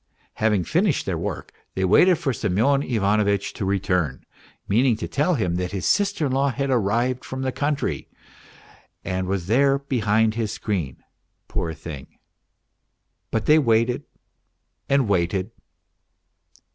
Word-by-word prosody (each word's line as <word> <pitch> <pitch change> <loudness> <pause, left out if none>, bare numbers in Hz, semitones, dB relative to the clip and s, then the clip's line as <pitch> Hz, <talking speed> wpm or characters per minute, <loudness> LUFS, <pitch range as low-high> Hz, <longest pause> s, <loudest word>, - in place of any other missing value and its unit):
Having 105 -4 +2
finished 175 - +1
their - - -1
work - - -5 0.2
they 95 - +1
waited 175 - +5
for 135 - -1
Semyon 115 +7 +1
Ivanovitch 100 -4 +1
to 95 - -4
return, 90 -7 -1 0.4
meaning 120 +3 +3
to - - -4
tell 155 +5 +1
him 90 -9 -1
that 90 +1 -3
his 95 -3 -3
sister 200 -6 +1
in 135 - -1
law 135 +2 +2
had 135 +1 -2
arrived 120 +2 +1
from 130 0 -5
the 130 - 0
country 145 +2 -2 1.0
and 95 0 -2
was 95 -2 -2
there 135 +7 +3
behind 110 -5 +1
his 110 -2 -2
screen, 85 -12 -3 0.4
poor 80 -1 -3
thing! 75 -5 -9 1.1
But 110 -1 -1
they 155 +1 +6
waited 115 -2 +1 0.8
and 135 -3 +3
waited. 95 +2 0
110 Hz, 135 wpm, -23 LUFS, 95-135 Hz, 1.1 s, they